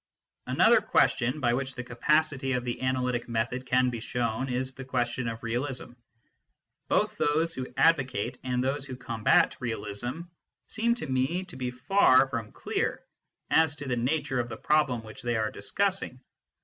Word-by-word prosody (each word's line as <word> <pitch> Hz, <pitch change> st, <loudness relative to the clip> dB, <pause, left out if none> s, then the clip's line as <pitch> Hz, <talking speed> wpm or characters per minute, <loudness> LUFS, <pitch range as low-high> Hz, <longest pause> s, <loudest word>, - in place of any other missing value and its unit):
Another -, -, +5 dB
question 125 Hz, +4 st, +2 dB
by 120 Hz, -4 st, +2 dB
which 130 Hz, +1 st, -2 dB
the 125 Hz, -, -5 dB
capacity 135 Hz, +2 st, +1 dB
of 125 Hz, -1 st, -1 dB
the 120 Hz, 0 st, -3 dB
analytic 125 Hz, -2 st, -1 dB
method 120 Hz, +3 st, -2 dB
can 125 Hz, 0 st, +3 dB
be 120 Hz, -, -4 dB
shown 120 Hz, +2 st, -2 dB
is 130 Hz, +1 st, -2 dB
the 135 Hz, -, -8 dB
question 120 Hz, -1 st, -1 dB
of 115 Hz, 0 st, -5 dB
realism. 125 Hz, +2 st, -3 dB, 1.0 s
Both -, -, +1 dB
those 160 Hz, +3 st, +2 dB
who 130 Hz, -1 st, -5 dB
advocate 130 Hz, -7 st, +2 dB
and 125 Hz, -1 st, 0 dB
those 135 Hz, +2 st, -1 dB
who 135 Hz, -2 st, -6 dB
combat 120 Hz, -3 st, +2 dB
realism 120 Hz, +4 st, -3 dB, 0.5 s
seem 235 Hz, +1 st, +1 dB
to 240 Hz, -, -5 dB
me 130 Hz, +8 st, 0 dB
to 180 Hz, -2 st, -12 dB
be 130 Hz, -1 st, -3 dB
far 130 Hz, +1 st, +4 dB
from 115 Hz, -4 st, -4 dB
clear -, -, -2 dB, 0.5 s
as 160 Hz, -2 st, +4 dB
to 145 Hz, -1 st, -7 dB
the 125 Hz, -, 0 dB
nature 135 Hz, +2 st, 0 dB
of 120 Hz, 0 st, -2 dB
the -, -, -6 dB
problem 145 Hz, -6 st, +1 dB
which 110 Hz, -1 st, -11 dB
they 120 Hz, 0 st, -1 dB
are 110 Hz, -1 st, 0 dB
discussing. 190 Hz, -, -1 dB
130 Hz, 165 wpm, -28 LUFS, 120-140 Hz, 1.0 s, Another